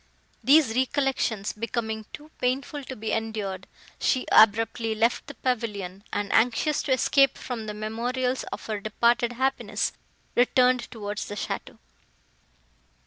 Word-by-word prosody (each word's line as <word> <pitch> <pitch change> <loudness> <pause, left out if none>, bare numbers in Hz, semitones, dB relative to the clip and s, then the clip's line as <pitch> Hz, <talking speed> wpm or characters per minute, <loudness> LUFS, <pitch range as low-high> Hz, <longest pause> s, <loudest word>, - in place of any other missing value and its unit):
These 270 -2 +5
recollections 260 -5 0
becoming 220 -1 -3
too 300 +1 -11
painful 275 +3 -1
to 260 - -6
be 220 -1 -4
endured, 210 -4 -3 0.3
she 255 - +1
abruptly 225 +1 +4
left 230 +5 +1
the 285 - -9
pavilion, 205 -6 -3
and, 205 -1 -2
anxious 250 +6 +2
to - - -3
escape 275 +1 +4
from 230 -4 -5
the 210 - -4
memorials 245 +4 -2
of - - -7
her 215 -2 -3
departed 235 +3 +1
happiness, 265 +2 -1 0.4
returned 250 0 +3
towards 210 -2 -5
the 205 - -6
château. - - -5
230 Hz, 130 wpm, -26 LUFS, 215-255 Hz, 0.4 s, These